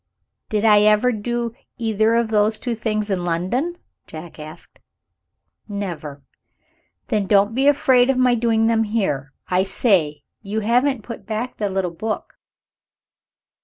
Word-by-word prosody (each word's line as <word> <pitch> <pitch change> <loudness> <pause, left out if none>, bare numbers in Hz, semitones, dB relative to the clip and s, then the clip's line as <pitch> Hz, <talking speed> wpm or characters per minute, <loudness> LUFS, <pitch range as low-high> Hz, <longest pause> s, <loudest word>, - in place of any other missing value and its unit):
"Did 215 0 0
I 210 -1 +6
ever 215 +4 +4
do 235 +1 -3 0.2
either 225 -1 +1
of 235 -1 +1
those 215 0 +2
two 240 +2 -3
things 215 -2 -2
in 180 -2 -1
London?" 190 - -1 0.3
Jack 160 +1 -10
asked. 155 +3 -11 0.9
"Never." 170 -9 -6 0.9
"Then 210 -5 0
don't 205 +2 +3
be 265 +4 +2
afraid 260 -3 +4
of 270 - +2
my 255 -1 +4
doing 225 -1 +2
them 225 0 +2
here. 190 -11 -2 0.2
I 180 0 +2
say! 185 - +1 0.2
you 215 +1 -3
haven't 245 +2 +1
put 225 -4 -9
back 225 +3 -4
the 205 -2 -1
little 190 -2 -1
book." 215 +6 -5
215 Hz, 140 wpm, -21 LUFS, 190-235 Hz, 0.9 s, I